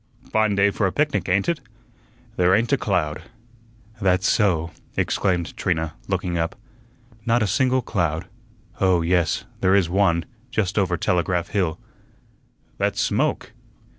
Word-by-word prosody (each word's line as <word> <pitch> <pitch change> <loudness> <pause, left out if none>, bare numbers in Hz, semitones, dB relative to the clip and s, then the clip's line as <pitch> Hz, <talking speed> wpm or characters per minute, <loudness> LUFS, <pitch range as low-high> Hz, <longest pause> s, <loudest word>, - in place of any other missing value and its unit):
"Fine 110 -1 +2
day 100 +1 +4
for 100 - 0
a - - -1
picnic, 145 -5 0
ain't 95 +2 +2
it? 170 -2 0 0.8
There 90 -1 +4
ain't 115 +4 +1
a - - +7
cloud." 85 - -1 0.8
"That's 95 -1 +2
so," 85 -6 +2 0.3
exclaimed 90 -5 0
Trina, 80 -3 -1
looking 90 -3 -1
up, 80 0 -1 0.7
"not 115 0 +2
a - - +2
single 125 +6 +2
cloud. 85 -7 -1 0.5
Oh, 90 -3 +3
yes; 85 -1 +1
there 95 0 +3
is 90 -4 +2
one, 90 -4 +2 0.2
just 105 -2 0
over 90 -3 +1
Telegraph 90 0 0
Hill." 90 -5 -1 1.0
"That's - - 0
smoke." - - 0
95 Hz, 135 wpm, -23 LUFS, 85-100 Hz, 1.0 s, a